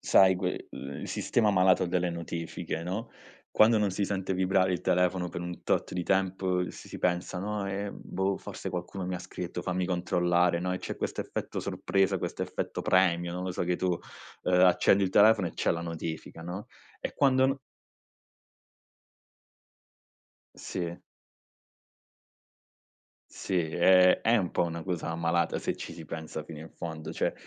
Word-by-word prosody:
sai 95 -1 +6
que 90 0 -3
il 70 0 -7
sistema 110 -3 +1
malato 95 -2 +4
delle 90 0 0
notifiche, 85 -1 -4
no, 95 +6 -4 0.4
quando 110 +1 +5
non 105 -2 +2
si 95 +1 -1
sente 95 -1 -2
vibrare 95 0 +2
il 90 - -1
telefono 90 0 +1
per 85 +1 -5
un 90 -1 -6
tot - - 0
di 90 - -1
tempo 95 -1 +1
si - - -12
si - - -7
pensa: 90 0 0
"No, 105 +1 -2
ehm, 100 +1 -4
boh, 95 0 -1
forse 95 - -6
qualcuno 90 +2 -4
mi 90 0 -3
ha - - -3
scritto, 90 0 -6
fammi 90 +1 -1
controllare", 90 -1 +2
no, 90 +1 -1
e 90 - -2
c'è - - -5
questo - - -3
effetto - - -4
sorpresa, 95 0 +1
questo - - -4
effetto - - -3
premio, 85 -2 +3
non 90 +1 -3
lo 95 - -2
so, - - -2
che 90 0 0
tu, 90 0 0 0.5
ehm, 90 0 +3
accendi 95 +2 +5
il 95 - +1
telefono 105 -2 +5
e - - -11
c'è - - 0
la 85 - -1
notifica, 80 -1 -5
no, 90 +5 -6 0.3
e - - -4
quando 130 -1 +4
no 135 +1 -1 3.0
Sì. 85 -1 -5 2.3
Sì, 95 - -2
ehm, 90 +2 +6
è 115 +2 +4
un 95 -6 0
po' - - +2
una 85 -1 -4
cosa 85 -2 -3
malata 85 +1 +1
se - - -2
ci - - -7
si 80 - -9
pensa 80 0 -6
fino 75 0 -9
in 80 +1 -9
fondo, 80 -2 -6
cioè - - 0
90 Hz, 165 wpm, -29 LUFS, 85-95 Hz, 3.0 s, sai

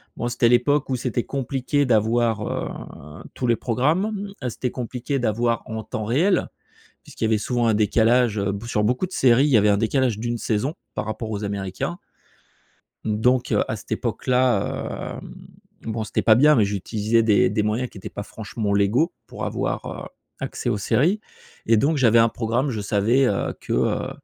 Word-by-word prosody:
bon, 120 - -3
c'était 120 -1 +2
l'époque 130 +4 +2
où 130 - +1
c'était 120 -1 -2
compliqué 135 +1 -1
d'avoir, 115 -1 +2
heu, 75 +4 -7
tous 125 - -3
les 120 - +4
programmes, 185 - 0 0.2
c'était 125 +1 -3
compliqué 125 +2 -3
d'avoir 115 0 0
en 110 0 -5
temps 110 - -5
réel 165 - +2 0.6
puisqu'il - - -6
y - - +4
avait 110 -1 +2
souvent 120 +2 0
un 115 - +4
décalage, 110 +2 +3
heu, 100 0 0
b 100 +3 -6
sur 105 -2 0
beaucoup 125 - +1
de 185 - -15
séries, 130 -1 +4
il - - +1
y 130 - +5
avait 105 -1 +4
un 100 - +3
décalage 115 0 +1
d'une 120 +1 -2
saison 115 +8 -1 0.2
par - - -3
rapport 110 +1 -4
aux 105 -1 -3
Américains. 100 - -4 1.1
Donc, 125 +4 +1
heu, - - +3
à - - -2
cette - - -12
époque-là, 125 -5 -1
hem, - - -11 0.5
bon 110 0 -3
c'était 110 - -1
pas 110 - +5
bien, 150 +4 +6
mais 110 - +4
j'utilisais 105 +3 0
des 105 -2 +4
des 105 - 0
moyens 110 +4 -1
qui - - -13
étaient 95 - -7
pas 100 - -6
franchement 110 -1 -4
légaux 105 - +2
pour - - -6
avoir, - - -2
heu, - - -6 0.3
accès - - -3
aux - - 0
séries 160 - +2 0.5
et 115 0 +4
donc 145 +8 +2
j'avais 120 -4 +5
un 115 0 +5
programme, 120 +5 -1
je 110 -5 -3
savais, 110 +6 +2
heu, 100 - -1
que, - - -4
heu - - 0
115 Hz, 190 wpm, -23 LUFS, 105-130 Hz, 1.1 s, bien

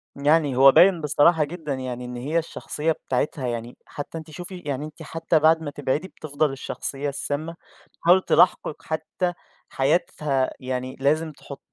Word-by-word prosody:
يعني 145 -1 +2
هو 135 +1 +8
باين 180 +1 +6
بصراحة 150 +2 +4
جدًا 150 -1 -5
يعني 125 -1 -5
إن 125 0 -7
هي 145 +7 0
الشخصية 160 -1 -3
بتاعتها 135 -2 -2
يعني 120 0 -5
حتى 145 +3 -7
أنتِ 160 -1 -9
شوفي 180 +4 -8
يعني 145 0 -3
أنتِ 155 +1 -10
حتى 165 +1 0
بعد 160 +1 +4
ما 145 - -4
تبعدي 145 +5 -2
بتفضَل 150 -3 -2
الشخصية 135 +1 -4
السامة 150 +4 -4 0.5
تحاول 180 +3 +5
تلاحقِك، 175 -5 +2
حتى 160 +3 -2 0.4
حياتها 140 -2 0
يعني 130 0 -4
لازم 155 +3 +1
تحُطّ 140 -1 -11
150 Hz, 155 wpm, -24 LUFS, 135-160 Hz, 0.5 s, هو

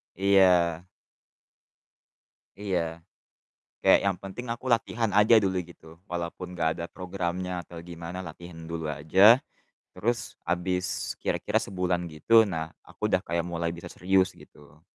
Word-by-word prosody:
Iya. 90 -3 +4 1.8
Iya, 85 -4 -2 0.8
kayak - - +7
yang 95 -2 +1
penting 100 +7 -8
aku 120 +2 -5
latihan 115 -1 0
aja 105 +3 +6
dulu 95 -3 +1
gitu, 80 -1 -16
walaupun 90 +1 -5
nggak 80 -1 +2
ada 85 0 -5
programnya 90 -1 -4
atau 85 +1 -12
gimana 85 +2 -7
latihan 85 +1 -10
dulu 80 -2 -3
aja, 95 - +6 0.6
terus 115 +6 0 0.3
habis 90 +1 -1
kira-kira - - 0
sebulan 90 -2 -2
gitu, 75 +8 -7 0.2
nah 80 -3 -4 0.2
aku - - -18
udah - - +4
kayak 85 +1 0
mulai 85 -1 -2
bisa 85 - -9
serius, 95 0 +2
gitu. 75 +1 -18
90 Hz, 130 wpm, -27 LUFS, 85-95 Hz, 1.8 s, kayak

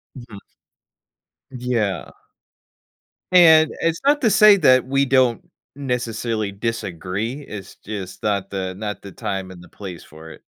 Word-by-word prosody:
Mhm. 120 -6 -11 1.1
Yeah. 120 -7 -2 1.2
And 160 -3 +7
it's 165 0 0
not 290 +1 +3
to 230 - +3
say 215 -1 +7
that 130 -8 +4
we 135 +1 +1
don't, 130 -3 +2 0.4
necessarily, 115 -5 -3
disagree, 105 - -4
it's 100 -9 -10
just 95 -3 -8
not 100 -2 -1
the 95 -1 -4
not 105 +1 -5
the 100 - -10
time 95 -2 -5
and 90 -1 -12
the 90 - -14
place 90 -2 -10
for 80 +1 -13
it. - - -14
110 Hz, 135 wpm, -21 LUFS, 95-130 Hz, 1.2 s, And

